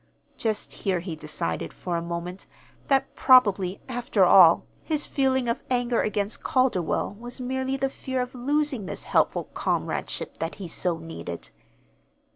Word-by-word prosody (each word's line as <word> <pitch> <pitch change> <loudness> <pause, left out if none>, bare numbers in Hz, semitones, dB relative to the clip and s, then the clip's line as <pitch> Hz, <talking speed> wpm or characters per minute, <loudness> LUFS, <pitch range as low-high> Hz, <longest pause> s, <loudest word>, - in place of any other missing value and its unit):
Just 220 -2 -2
here 190 -3 -1
he 170 -1 -5
decided, 115 - -3
for 175 -2 -4
a 170 - 0
moment, 170 +2 -5 0.4
that 270 -1 +2
probably, 200 -8 +4
after 235 -6 +2
all, 175 -2 +7 0.2
his 305 -2 -1
feeling 265 -2 +1
of 235 +2 -1
anger 245 -1 +1
against 210 0 -2
Calderwell 220 -7 +1
was 240 +2 -6
merely 260 +1 -2
the 270 0 +1
fear 260 -1 -4
of 250 0 -3
losing 270 -3 -1
this - - -6
helpful - - +2
comradeship - - -2
that 165 +1 -3
he 195 -3 -7
so 170 +1 0
needed. 160 - -8
220 Hz, 145 wpm, -26 LUFS, 175-260 Hz, 0.4 s, all